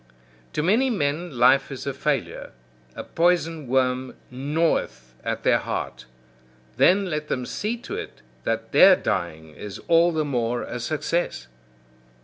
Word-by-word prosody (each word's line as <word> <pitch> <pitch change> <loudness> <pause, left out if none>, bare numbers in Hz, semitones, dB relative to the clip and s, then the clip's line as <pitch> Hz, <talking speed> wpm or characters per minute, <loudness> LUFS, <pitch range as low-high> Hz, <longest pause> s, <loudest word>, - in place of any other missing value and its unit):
To 150 - -1
many 225 +10 +3
men 155 - -2
life 135 +3 +4
is 135 - -7
a 140 - -2
failure; 140 +1 -3 0.4
a - - -6
poison 165 -3 0
worm 130 0 0 0.2
gnaweth 140 - -1
at - - -3
their - - +4
heart. 65 0 -5 0.7
Then 195 +2 +4
let 150 -4 -3
them 125 -4 -2
see 220 - -3
to 240 - -7
it - - -8 0.2
that - - -2
their - - +8
dying 80 -2 -3
is 100 +6 -8
all 170 0 +5
the 155 -2 -1
more 120 -3 -1
a 125 - -6
success. 155 - -2
145 Hz, 140 wpm, -24 LUFS, 125-170 Hz, 0.7 s, their